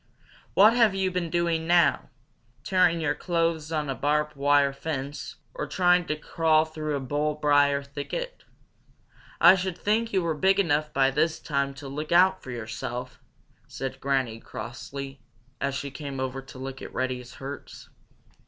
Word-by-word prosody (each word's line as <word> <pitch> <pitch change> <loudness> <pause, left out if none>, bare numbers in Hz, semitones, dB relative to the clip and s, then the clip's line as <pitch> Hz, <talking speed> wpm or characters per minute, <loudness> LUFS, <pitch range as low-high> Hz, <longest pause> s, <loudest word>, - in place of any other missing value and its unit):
"What 210 +4 +7
have 230 -5 +4
you 190 -1 0
been 175 -2 -2
doing 170 -1 0
now 170 - +3 0.5
tearing 175 -2 +3
your 145 -2 +1
clothes 165 -2 -1
on 155 -2 -1
a 135 - -1
barbed 150 +2 0
wire 140 0 +3
fence 140 -1 -5 0.2
or - - -4
trying 180 -1 +3
to 150 - 0
crawl 155 0 +2
through 155 -2 -4
a - - -1
bull 145 +3 -1
briar 145 -1 +3
thicket? 150 - -6 1.0
I - - +9
should 185 -2 -2
think 225 +2 0
you 190 -3 +1
were 165 -1 0
big 190 +6 +3
enough 150 -4 +1
by 135 0 +3
this 160 +3 +1
time 140 -3 -1
to 140 +1 -9
look 150 +3 -5
out 180 +2 +5
for - - -11
yourself!" 120 +1 -5 0.5
said 135 -1 -5
Granny 130 -5 0
Fox - - -22
crossly, 135 +3 -7 0.4
as 140 -1 -1
she 140 0 -4
came 140 -1 -6
over 130 0 -3
to 135 - -13
look 135 0 -7
at - - -8
Reddy's 125 -1 -3
hurts. 140 +1 -8
150 Hz, 165 wpm, -26 LUFS, 135-170 Hz, 1.0 s, I